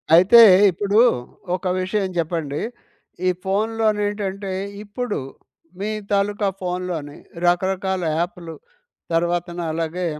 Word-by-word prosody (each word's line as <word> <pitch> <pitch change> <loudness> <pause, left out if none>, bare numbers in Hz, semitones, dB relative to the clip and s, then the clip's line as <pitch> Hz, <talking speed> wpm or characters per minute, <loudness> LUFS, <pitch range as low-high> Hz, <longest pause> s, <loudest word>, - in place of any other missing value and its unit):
అయితే 185 +7 +7 0.3
ఇప్పుడు 200 +4 +1 0.6
ఒక 185 - -8 0.2
విషయం 195 +1 -1
చెప్పండి. 160 -3 -2 0.7
ఈ - - +5
ఫోన్‌లోనేంటంటే, 205 -1 -1 0.3
ఇప్పుడు 215 +2 -4 0.6
మీ 205 +2 -2 0.2
తాలూకా 205 +1 +1
ఫోన్‍లోని 180 -5 -4 0.3
రకరకాల 190 +1 +1 0.2
యాప్‍లు, 175 -1 -4 0.6
తర్వాతన 175 +1 0
అలాగే 165 +2 -2
190 Hz, 90 wpm, -21 LUFS, 175-205 Hz, 0.7 s, అయితే